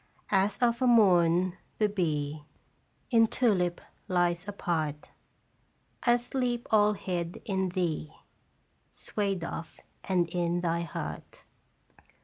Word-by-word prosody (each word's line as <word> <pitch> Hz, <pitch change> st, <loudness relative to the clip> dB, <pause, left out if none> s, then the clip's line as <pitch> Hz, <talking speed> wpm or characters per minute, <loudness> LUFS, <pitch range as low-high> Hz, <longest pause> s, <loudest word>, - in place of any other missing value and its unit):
As, 195 Hz, +1 st, +2 dB
of 235 Hz, 0 st, +1 dB
a 255 Hz, -, +3 dB
morn, 180 Hz, -5 st, +4 dB, 0.2 s
the 215 Hz, -, +3 dB
bee 155 Hz, -7 st, -2 dB, 0.7 s
In 225 Hz, -2 st, +5 dB
tulip 185 Hz, -8 st, +1 dB, 0.3 s
lies 175 Hz, 0 st, +1 dB
apart, 160 Hz, -7 st, -2 dB, 0.9 s
I 240 Hz, -1 st, +4 dB
sleep 245 Hz, 0 st, -2 dB
all 210 Hz, -1 st, +5 dB
hid 180 Hz, -4 st, -4 dB
in 190 Hz, -2 st, 0 dB
thee, 170 Hz, -4 st, -2 dB, 0.8 s
Swayed 195 Hz, -4 st, -2 dB
of 165 Hz, -1 st, -6 dB, 0.2 s
and 180 Hz, -3 st, +1 dB
in 175 Hz, 0 st, 0 dB
thy 170 Hz, -1 st, 0 dB
heart. 170 Hz, -, -7 dB
185 Hz, 110 wpm, -29 LUFS, 170-210 Hz, 0.9 s, In